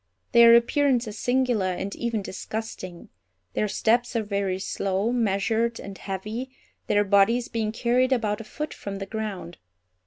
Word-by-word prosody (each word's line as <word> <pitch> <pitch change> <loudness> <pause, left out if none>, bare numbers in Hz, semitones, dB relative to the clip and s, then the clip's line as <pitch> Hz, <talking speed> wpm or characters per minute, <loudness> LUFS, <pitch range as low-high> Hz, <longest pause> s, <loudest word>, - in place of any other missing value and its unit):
Their 235 -1 +8
appearance 245 0 +3
is 210 0 -7
singular, 245 -7 +1
and 195 +2 -4
even 230 -3 -2
disgusting. 190 -3 -6 0.4
Their 210 - 0
steps 240 +4 +1
are 225 - +1
very 200 -2 -1
slow, 195 +3 -1
measured, 230 0 0
and 195 0 -8
heavy, 210 +7 -5 0.4
their 205 0 +3
bodies 205 +5 +3
being 220 -2 -1
carried 245 +3 +1
about 220 -4 0
a - - -10
foot 300 +7 -5
from 200 -1 -6
the 195 0 -5
ground. 200 -5 -5
220 Hz, 150 wpm, -25 LUFS, 200-235 Hz, 0.4 s, Their